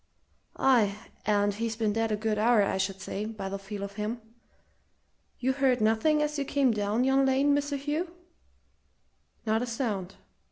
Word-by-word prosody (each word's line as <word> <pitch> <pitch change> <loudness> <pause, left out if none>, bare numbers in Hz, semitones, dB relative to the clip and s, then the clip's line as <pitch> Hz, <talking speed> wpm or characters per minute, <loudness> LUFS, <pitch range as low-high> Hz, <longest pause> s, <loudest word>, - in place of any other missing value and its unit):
"Aye, 220 -7 +3 0.3
and 205 -1 +2
he's 225 +2 -3
been 215 -2 0
dead 225 0 0
a - - +2
good 215 0 -1
hour, 225 -1 +4
I 195 - 0
should 195 0 -2
say, 200 +1 -4
by 215 -3 -5
the 195 0 -4
feel 200 0 -6
of 200 +1 -7
him! 215 +3 -3 1.2
You 260 +1 +1
heard 260 -2 +2
nothing 225 +8 +3
as 300 0 -2
you - - +1
came 270 -2 +2
down 210 +2 0
yon 270 +1 +3
lane, 270 +2 +3
Mr. 285 0 -1
Hugh?" 305 +5 -2 1.3
"Not 220 +1 +1
a 245 - -2
sound!" 215 -6 -3
225 Hz, 170 wpm, -28 LUFS, 205-270 Hz, 1.3 s, hour